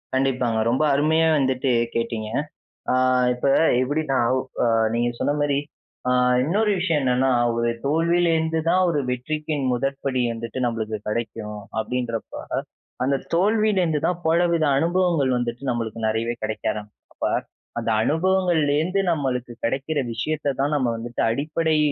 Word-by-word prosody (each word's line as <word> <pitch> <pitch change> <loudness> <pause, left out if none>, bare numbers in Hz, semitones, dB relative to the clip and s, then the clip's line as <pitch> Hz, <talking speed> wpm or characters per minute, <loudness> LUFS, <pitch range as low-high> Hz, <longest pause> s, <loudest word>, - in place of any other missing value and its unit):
கண்டிப்பாங்க. 125 -4 +1
ரொம்ப 130 +6 +1
அருமையா 160 +3 +3
வந்துட்டு 130 -1 +1 0.2
கேட்டீங்க. 115 -2 -2 0.6
ஆ - - +3 0.4
இப்ப 125 +3 -2 0.3
எப்பிடீன்னா? 140 +1 0 0.4
அ - - +3 0.3
நீங்க 120 +1 +1
சொன்ன 145 - +1
மாரி 145 -1 +1 0.5
ஆ - - +2 0.3
இன்னொரு 210 +9 +1
விஷயம் 165 -4 +1
என்னன்னா, 130 0 +2 0.3
ஒரு 115 0 +1
தோல்விலேருந்து 165 +1 +2
தான், 185 +2 +3
"ஒரு 155 -3 +1
வெற்றிக்கின் 150 +4 -2
முதற்படி 135 0 -1
வந்துட்டு 115 +2 -5
நம்பளுக்கு 110 -2 -2
கிடைக்கும்," 105 -1 -4 0.2
அப்டீன்றப்ப, 120 -1 -4 0.7
அந்த 135 +1 +2 0.2
தோல்விலேருந்து 190 -4 +2
தான் 175 0 0
பலவித 170 0 +3
அனுபவங்கள் 170 -3 +2
வந்துட்டு, 120 +1 -3
நம்மளுக்கு 115 -2 -2
நிறையவே 115 +2 0
கிடைக்க 110 0 -4
ஆரம்பிக்கும். 105 0 -11
அப்ப - - -1 0.5
அந்த 115 -1 -2
அனுபவங்கள்லேருந்து 170 - +1
நம்மளுக்கு 130 -6 -2
கிடைக்கிற 140 +5 -1
விஷயத்த 145 +5 -2
தான் 145 +2 +1
நம்ம 130 -4 +1
வந்துட்டு, 120 +1 -4
அடிப்படை 155 +5 0
140 Hz, 125 wpm, -23 LUFS, 120-160 Hz, 0.7 s, அருமையா